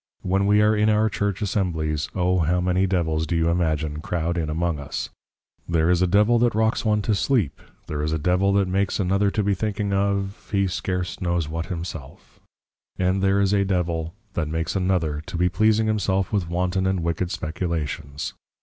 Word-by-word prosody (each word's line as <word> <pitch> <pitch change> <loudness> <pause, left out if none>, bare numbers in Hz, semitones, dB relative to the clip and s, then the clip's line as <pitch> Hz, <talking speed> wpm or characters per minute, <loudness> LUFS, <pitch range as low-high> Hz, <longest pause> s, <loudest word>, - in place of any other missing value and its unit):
_ - - -3
When 95 +2 +2
we 105 +1 +5
are 105 +1 +4
in 105 +1 +3
our 110 +1 +3
Church 100 0 -1
Assemblies, 80 -7 -1
O 90 0 +2
how 85 +2 +2
many 90 +1 +1
Devils, 80 -4 0
do 85 - -1
you 80 0 +2
imagine, 80 -3 0
croud 85 +1 -2
in 80 -3 -2
among 80 0 -1
us! 70 - -4 0.6
There 85 0 +2
is 90 0 +2
a 90 - +4
Devil 105 +6 +4
that 120 -2 +2
rocks 110 +1 +1
one 105 -2 +1
to 110 - +1
Sleep, 105 - 0 0.2
there 75 -1 -3
is 75 +1 -1
a 80 - +1
Devil 90 +5 +2
that 100 -1 +2
makes 95 +2 0
another 100 +1 +2
to 105 +1 -1
be 100 0 +2
thinking 100 0 -2
of, 100 0 -1
he 100 -1 +2
scarce 90 -1 -3
knows 85 -3 0
what 80 +2 -4
himself; 85 -6 -7 0.6
and 95 +1 +1
there 95 +1 +3
is 100 0 +2
a 100 -1 +3
Devil, 85 -3 -1 0.2
that 85 -5 -1
makes 80 +3 -2
another, 90 -6 0
to - - -4
be 90 +1 +2
pleasing 110 +3 +3
himself 100 -2 0
with 95 -5 0
wanton 90 +2 0
and 95 -2 0
wicked 85 +1 -1
Speculations. 80 -5 -3
90 Hz, 195 wpm, -24 LUFS, 85-100 Hz, 0.6 s, we